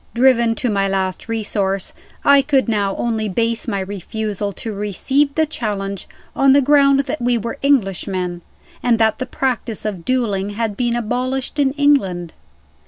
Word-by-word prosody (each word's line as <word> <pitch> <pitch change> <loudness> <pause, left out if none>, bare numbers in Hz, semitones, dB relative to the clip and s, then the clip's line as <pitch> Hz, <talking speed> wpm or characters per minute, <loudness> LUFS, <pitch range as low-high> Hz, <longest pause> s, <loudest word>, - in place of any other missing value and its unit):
Driven 235 -2 +4
to 245 - -1
my 195 -1 +1
last 190 +1 -2
resource, 200 -4 -1 0.3
I 280 0 +7
could 270 -2 +1
now 205 -3 0
only 220 -2 -1
base 230 +5 -1
my 200 -4 -1
refusal 205 +1 -4
to 220 +2 -5
receive 265 - 0
the 315 - +3
challenge 200 - -4 0.3
on 270 0 +5
the 285 - +5
ground 275 0 +4
that 255 - -4
we 240 0 +2
were 235 +5 -5
Englishmen, 195 -9 0 0.4
and 240 -2 +3
that 220 -1 +2
the 255 - -3
practice 245 -6 -2
of 195 -5 -3
dueling 205 -5 0
had 225 -3 -1
been 240 0 0
abolished 255 +4 -2
in 270 -2 +2
England. 200 - +1
225 Hz, 160 wpm, -19 LUFS, 200-260 Hz, 0.4 s, I